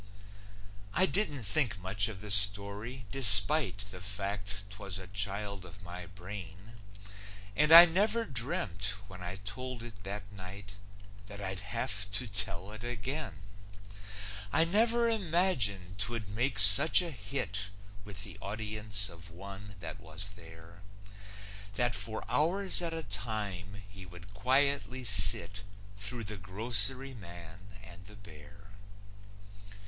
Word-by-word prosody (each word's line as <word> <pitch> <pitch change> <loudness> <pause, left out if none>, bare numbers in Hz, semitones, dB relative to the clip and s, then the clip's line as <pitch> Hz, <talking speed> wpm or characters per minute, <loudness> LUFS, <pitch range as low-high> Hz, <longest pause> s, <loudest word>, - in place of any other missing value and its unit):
I 185 - +4
didn't 175 - +1
think 105 +1 0
much 95 +3 0
of 100 -4 -8
the 105 -1 -4
story 100 +5 +4
despite 120 - +7
The 90 -2 -11
fact 100 0 -4
'twas 100 -2 -5
a 95 - -8
child 100 0 -3
of 95 +2 -13
my 90 0 -10
brain. 95 +2 -11 0.8
And 150 +2 +2
I 170 +1 +11
never 210 +7 0
dreamt, 100 - -3
when 90 -1 -13
I 90 +1 -7
told 120 +5 -7
it 110 -4 -12
that 100 +1 -8
night, 100 +1 -11 0.6
That 100 -1 -10
I'd 95 -2 -5
have 105 0 -4
to 125 +6 +1
tell 100 -2 -1
it 110 +1 -10
again; 125 - -5 1.1
I 160 - +2
never 230 +7 +2
imagined 155 - -1
'twould 110 -2 -2
make 115 +3 -2
such 110 - +7
a 170 - -7
hit 100 -4 -3 0.3
With 100 -1 -1
the 100 -5 -6
audience 105 0 -2
of 85 0 -11
one 95 +3 -12
that 80 -2 -8
was 100 +2 -6
there 85 -1 -15 0.9
That 120 +2 0
for 105 +2 -2
hours 170 - +2
at 170 -1 -4
a 165 0 -5
time 100 -3 -6
he 95 -2 -12
would 90 +2 -15
quietly 130 +3 0
sit 100 -2 +5 0.3
Through 100 +4 -4
The 105 0 -5
Grocery 115 +7 0
Man 85 -3 -13 0.2
and 90 0 -14
the 105 - -13
Bear. 100 -1 -16
100 Hz, 135 wpm, -29 LUFS, 95-125 Hz, 1.1 s, I